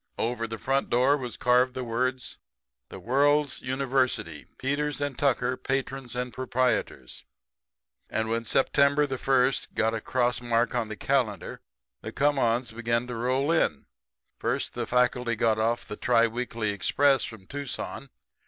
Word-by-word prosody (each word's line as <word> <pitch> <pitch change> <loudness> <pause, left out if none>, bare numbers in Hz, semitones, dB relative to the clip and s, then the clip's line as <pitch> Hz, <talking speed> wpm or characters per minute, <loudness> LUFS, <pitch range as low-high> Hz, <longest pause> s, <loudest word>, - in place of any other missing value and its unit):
Over 115 0 -1
the 115 0 -5
front 135 +3 0
door 130 +4 +4
was 125 -6 -5
carved 125 +1 +3
the 130 - -3
words: 125 +2 -2 0.5
'The - - -9
World's 145 +3 +2
University; 130 - -1
Peters 145 +1 -1
& 135 - -16
Tucker, 130 -3 +1
Patrons 135 -1 -3
and 125 -1 -3
Proprietors. 130 +1 -1 0.9
And 110 0 -1
when 115 +1 -1
September 140 +4 +3
the 135 -3 -4
first 130 -1 +1
got 110 +1 +1
a 115 - -3
cross 125 0 0
mark 120 0 +1
on 120 -3 -1
the 110 - -6
calendar, 120 -9 -1 0.4
the - - -6
come 145 0 +1
ons 120 0 +1
begun 115 +1 -1
to 125 -1 -6
roll 130 +6 0
in. 120 - +1 0.5
First - - -1
the - - -3
faculty 125 -1 +1
got 110 0 +1
off 120 +2 0
the 105 - -6
tri 115 - +3
weekly 115 -2 -2
express 135 +7 +2
from 110 -4 -8
Tucson. 140 +1 -5
125 Hz, 155 wpm, -27 LUFS, 115-135 Hz, 0.9 s, door